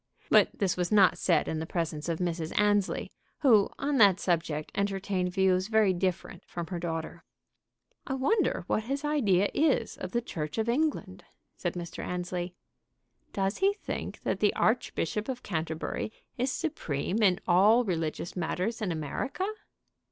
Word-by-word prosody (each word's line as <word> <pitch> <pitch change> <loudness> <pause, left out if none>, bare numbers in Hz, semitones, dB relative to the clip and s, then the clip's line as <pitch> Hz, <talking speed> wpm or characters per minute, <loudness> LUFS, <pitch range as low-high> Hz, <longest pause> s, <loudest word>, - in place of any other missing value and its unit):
But - - +6
this 195 -3 +1
was 180 +1 -1
not 200 -3 +5
said 175 - +2
in 160 - -2
the 160 - -4
presence 165 -2 -3
of 165 - 0
Mrs. 165 -2 -2
Annesley, 205 -2 +1 0.3
who 225 -8 +5
on 285 0 0
that 200 -5 +6
subject 165 -5 -1
entertained 195 -2 -1
views 190 0 +2
very 220 -3 +3
different 185 0 -2
from 170 -1 -5
her 175 - -2
daughter. 165 -2 -4 0.8
"I 265 - -1
wonder 365 - +1
what 215 +3 -1
his 275 +4 -2
idea 205 -11 +2
is 280 -7 +1
of 185 - -6
the 240 - +1
Church 155 -9 -5
of 220 0 0
England?" 300 +6 -1 0.3
said - - -3
Mr. 175 -1 -6
Annesley. 180 0 -4 0.8
"Does 195 +1 -1
he 390 +1 +4
think 410 - -6
that - - -1
the - - +2
Archbishop 210 +4 0
of 255 -1 -4
Canterbury 160 +3 -3 0.2
is 255 +2 0
supreme 210 - -2
in 190 -3 +4
all 205 +7 +5
religious 165 -2 -2
matters 185 +6 -2
in 200 -4 -1
America?" 165 - -3
190 Hz, 155 wpm, -29 LUFS, 175-225 Hz, 0.8 s, But